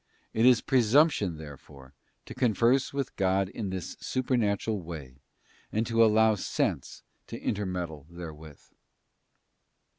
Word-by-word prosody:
It 115 Hz, +2 st, +4 dB
is 125 Hz, -3 st, +6 dB
presumption 125 Hz, -, +3 dB
therefore 70 Hz, -3 st, -12 dB, 0.3 s
to -, -, -9 dB
converse 125 Hz, +1 st, +2 dB
with 140 Hz, -2 st, -4 dB
God 95 Hz, 0 st, +1 dB
in 100 Hz, -1 st, -5 dB
this 95 Hz, -2 st, -5 dB
supernatural 110 Hz, -5 st, -1 dB
way 75 Hz, -6 st, -9 dB, 0.5 s
and 110 Hz, +2 st, 0 dB
to 115 Hz, 0 st, +3 dB
allow 110 Hz, 0 st, +5 dB
sense 105 Hz, -, -2 dB, 0.2 s
to -, -, -7 dB
intermeddle 90 Hz, -7 st, -3 dB
therewith. 80 Hz, -4 st, -10 dB
100 Hz, 115 wpm, -28 LUFS, 85-115 Hz, 0.5 s, is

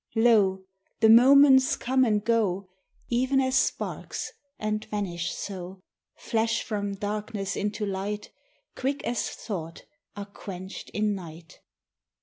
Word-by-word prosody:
Lo, 210 Hz, -5 st, +4 dB, 0.4 s
the 220 Hz, -, +5 dB
moments 265 Hz, +2 st, +7 dB
come 260 Hz, +1 st, +1 dB
and 210 Hz, -4 st, +1 dB
go, 200 Hz, -5 st, +1 dB, 0.4 s
E'en 260 Hz, +3 st, +2 dB
as 260 Hz, 0 st, +1 dB
sparks, -, -, -1 dB, 0.3 s
and 215 Hz, 0 st, -2 dB
vanish 175 Hz, -5 st, -3 dB
so; 190 Hz, -1 st, -6 dB, 0.4 s
Flash 225 Hz, 0 st, -1 dB
from 205 Hz, -2 st, -3 dB
darkness 205 Hz, -1 st, -3 dB
into 210 Hz, +1 st, -2 dB
light, 205 Hz, +1 st, -4 dB, 0.4 s
Quick 275 Hz, +2 st, -2 dB
as 240 Hz, -1 st, -1 dB
thought 165 Hz, -7 st, -6 dB, 0.3 s
are 205 Hz, -1 st, -6 dB
quenched 190 Hz, -2 st, -9 dB
in 210 Hz, 0 st, 0 dB
night. 165 Hz, -4 st, -10 dB
210 Hz, 120 wpm, -27 LUFS, 195-235 Hz, 0.4 s, moments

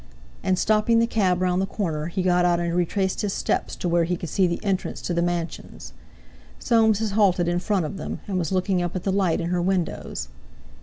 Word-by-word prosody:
And, 185 Hz, -1 st, +1 dB
stopping 215 Hz, +3 st, +3 dB
the 230 Hz, -, +4 dB
cab 185 Hz, -6 st, +1 dB
round 180 Hz, 0 st, +1 dB
the 195 Hz, -, -1 dB
corner, 160 Hz, -7 st, -3 dB
he 180 Hz, +2 st, -2 dB
got 180 Hz, -1 st, +3 dB
out 175 Hz, -1 st, +3 dB
and 170 Hz, 0 st, -1 dB
retraced 185 Hz, +2 st, 0 dB
his 205 Hz, -2 st, -1 dB
steps -, -, -1 dB
to -, -, -3 dB
where 170 Hz, 0 st, +3 dB
he 175 Hz, +1 st, -1 dB
could 170 Hz, -, -6 dB
see 190 Hz, -2 st, +2 dB
the 170 Hz, -, -2 dB
entrance 195 Hz, -3 st, -1 dB
to 175 Hz, -, -2 dB
the 170 Hz, -, +1 dB
mansions. 170 Hz, -, -4 dB, 0.6 s
Soames 225 Hz, -3 st, +3 dB
had 220 Hz, -1 st, -2 dB
halted 190 Hz, -4 st, +3 dB
in 175 Hz, 0 st, +1 dB
front 190 Hz, -2 st, 0 dB
of 190 Hz, -, -5 dB
them, -, -, -5 dB
and 190 Hz, -2 st, -1 dB
was 170 Hz, -1 st, -2 dB
looking 185 Hz, 0 st, +1 dB
up 175 Hz, 0 st, -3 dB
at 185 Hz, -, -3 dB
the 195 Hz, -, 0 dB
light 190 Hz, -4 st, +1 dB
in 170 Hz, -, -2 dB
her 180 Hz, 0 st, 0 dB
windows. 175 Hz, -, -2 dB
180 Hz, 225 wpm, -24 LUFS, 175-195 Hz, 0.6 s, the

